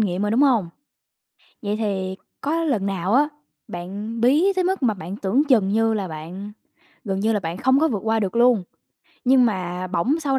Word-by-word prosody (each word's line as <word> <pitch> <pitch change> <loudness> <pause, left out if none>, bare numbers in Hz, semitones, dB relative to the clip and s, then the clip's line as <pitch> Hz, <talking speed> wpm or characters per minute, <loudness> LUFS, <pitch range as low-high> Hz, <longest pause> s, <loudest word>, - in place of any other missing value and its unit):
nghiệm 190 -2 0
rồi, 210 - 0
đúng 235 +5 +2
hông? 235 -11 +3 0.9
Vậy 205 +1 -1
thì 190 -3 -2 0.2
có 325 +4 -1
lần 230 -11 0
nào 195 +1 -1
á, 295 +3 +4 0.4
bạn 200 +6 -6
bí 300 - +4
tới 370 -1 +1
mức 380 -2 -1
mà 230 -4 +2
bạn 185 +1 -7
tưởng 210 +7 +1
chừng 220 -8 +4
như 225 +2 +2
là 195 -4 -2
bạn 175 +7 -8 0.5
gần 195 -3 -2
như 220 +2 +2
là 210 - 0
bạn 165 +1 -4
không 260 +2 +3
có 320 - +3
vượt 220 - -1
qua 225 0 +1
được 200 +2 -2
luôn, 235 -4 +4 0.6
nhưng 255 0 +5
mà 185 -3 -3
bỗng 255 - 0
sau 275 -3 +1
215 Hz, 200 wpm, -22 LUFS, 190-260 Hz, 0.9 s, nhưng